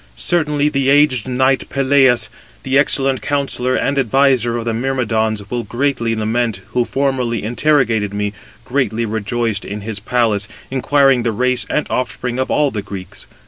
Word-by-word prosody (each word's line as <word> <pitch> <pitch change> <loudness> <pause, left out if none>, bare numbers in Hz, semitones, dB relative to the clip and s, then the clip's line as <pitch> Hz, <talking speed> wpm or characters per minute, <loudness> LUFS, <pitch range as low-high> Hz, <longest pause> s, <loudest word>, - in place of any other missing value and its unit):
Certainly 150 - +1
the 135 -2 0
aged 140 -5 +3
knight 130 +1 +1
Peleus, 135 -2 +3 0.3
the 130 - -1
excellent 135 -1 +3
counsellor 135 -3 -1
and 140 0 0
adviser 130 -2 +2
of 115 - -4
the 115 - -1
Myrmidons, 110 -4 -1
will 120 -1 -1
greatly 120 0 -1
lament, 110 -1 -1
who 125 -1 0
formerly 130 -5 -1
interrogated 115 -3 +1
me, 105 0 -2 0.3
greatly 125 -4 -1
rejoiced 110 0 -2
in 105 +1 -6
his 105 0 -5
palace, 110 -2 0 0.2
inquiring 135 0 +3
the 115 -1 0
race 125 +3 0
and 150 - 0
offspring 125 0 -2
of 130 - -1
all 145 -2 +2
the 105 - -3
Greeks. 100 -2 -8
125 Hz, 150 wpm, -17 LUFS, 110-135 Hz, 0.3 s, aged